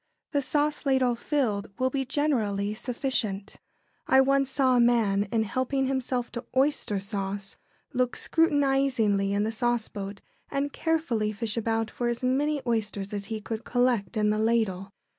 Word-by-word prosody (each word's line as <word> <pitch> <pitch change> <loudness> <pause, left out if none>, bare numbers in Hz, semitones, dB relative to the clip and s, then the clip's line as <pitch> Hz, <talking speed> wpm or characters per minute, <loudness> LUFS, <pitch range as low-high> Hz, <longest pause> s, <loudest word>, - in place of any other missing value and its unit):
The 285 -2 +1
sauce 295 +2 0
ladle, 260 -3 +3
filled, 235 -6 -1
will 260 0 +1
be 270 0 -1
generally 215 -8 0
sufficient. 220 -4 -2 0.5
I 265 - +6
once 275 0 +3
saw 265 -2 +3
a - - +4
man, 225 -4 +3
in 225 -1 +2
helping 260 +5 -1
himself 255 -2 -1
to 240 0 -5
oyster 265 -7 +2
sauce, 195 0 -4 0.4
look 250 -1 +1
scrutinisingly 270 -10 +2
in 200 +1 +1
the 220 - -1
sauceboat 220 -4 -2 0.3
and 280 0 -2
carefully 270 -10 0
fish 220 0 -2
about 225 -1 -1
for 240 - -2
as 240 +1 -2
many 280 +3 +1
oysters 210 -4 -2
as 200 -1 -3
he 220 0 -4
could 220 +1 -5
collect 245 -3 +1
in 210 0 +3
the 215 - 0
ladle. 215 -4 0
240 Hz, 155 wpm, -27 LUFS, 210-265 Hz, 0.5 s, I